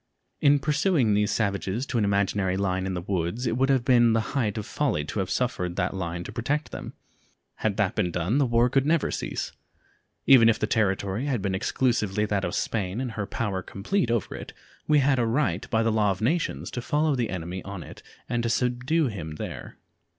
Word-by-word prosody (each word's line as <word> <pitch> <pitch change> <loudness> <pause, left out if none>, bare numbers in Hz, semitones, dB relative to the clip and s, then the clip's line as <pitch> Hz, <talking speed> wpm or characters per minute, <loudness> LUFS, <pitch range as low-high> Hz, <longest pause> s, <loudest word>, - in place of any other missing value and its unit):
In 145 0 +5
pursuing 150 - +2
these 105 +1 +2
savages 100 - -1
to 125 - -1
an 105 - +2
imaginary 100 -1 +1
line 95 -1 0
in 95 - -2
the 90 - -4
woods 95 +5 -2
it 115 - 0
would 135 +2 +2
have 130 -3 +2
been 120 -3 +5
the 115 - +3
height 115 -8 0
of 105 - -3
folly 115 - -1
to 90 - -4
have 95 -2 -1
suffered 90 -9 -1
that 95 -2 -1
line 85 -2 -4
to 105 - -8
protect 135 +7 -2
them. - - -7 0.6
Had 105 -2 -1
that 105 -4 +1
been 95 -5 0
done 90 - 0
the 140 - +3
war 120 +1 +3
could 135 +1 +2
never 165 -1 +2
cease. - - -3 0.7
Even 120 -4 +7
if 115 - +3
the - - 0
territory 100 +1 0
had 130 -5 0
been 95 0 -2
exclusively 105 0 0
that 105 -2 -1
of 85 - -2
Spain 100 -1 -2
and 130 -2 -3
her 105 -3 -4
power 100 -5 -2
complete 115 - -1
over 115 -5 -1
it, - - -8 0.3
we 150 - +5
had 135 -2 +3
a 120 - +2
right 115 - 0
by 110 0 +2
the 115 - +2
law 105 -2 +2
of 95 -1 -1
nations 155 +9 -1
to 125 - -4
follow 150 +3 +1
the 120 -3 -1
enemy 90 0 -4
on 95 -2 -7
it - - -12 0.3
and 120 -1 -1
to 115 - -1
subdue 125 +7 +1
him 85 - -5
there. - - -7
110 Hz, 215 wpm, -26 LUFS, 95-125 Hz, 0.7 s, Even